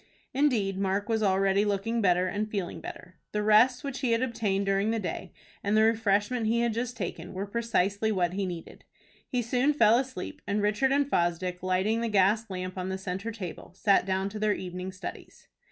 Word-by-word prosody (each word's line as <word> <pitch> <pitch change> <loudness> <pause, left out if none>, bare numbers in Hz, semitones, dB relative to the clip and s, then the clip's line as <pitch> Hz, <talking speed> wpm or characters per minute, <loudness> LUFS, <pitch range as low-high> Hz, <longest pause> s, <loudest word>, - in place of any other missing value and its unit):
Indeed 230 -9 +1
Mark 200 +1 0
was 220 -1 +1
already 195 0 +3
looking 210 +3 0
better 180 -2 +3
and 210 +3 -2
feeling 195 -5 -3
better. 180 - -9 0.2
The 210 0 0
rest 230 +6 +5
which 275 -2 -4
he 250 -4 +1
had 230 +2 +1
obtained 215 -5 -1
during 195 +2 +1
the 225 - +1
day, 200 -5 -4 0.3
and 205 +2 +2
the 220 - +6
refreshment 220 +1 +2
he 235 +1 +2
had 235 -1 +1
just 235 +1 -3
taken, 185 -2 -5
were 195 +2 -2
precisely 220 -1 0
what 180 -4 0
he 195 0 -1
needed. 175 -2 -8 0.4
He 245 -1 -1
soon 250 +5 +2
fell 235 -4 +5
asleep, 270 +3 -5
and 205 +1 0
Richard 210 +6 +2
and 280 0 +2
Fosdick, 180 - 0
lighting 185 +5 +1
the 235 - -1
gas 210 +2 +3
lamp 185 0 -5
on 185 +1 -3
the 190 - -2
centre 190 +4 -4
table, 185 -4 -8
sat 195 -1 +3
down 190 0 0
to 210 +1 -7
their 215 -1 +2
evening 185 0 -5
studies. 185 - -9
205 Hz, 200 wpm, -28 LUFS, 190-230 Hz, 0.4 s, the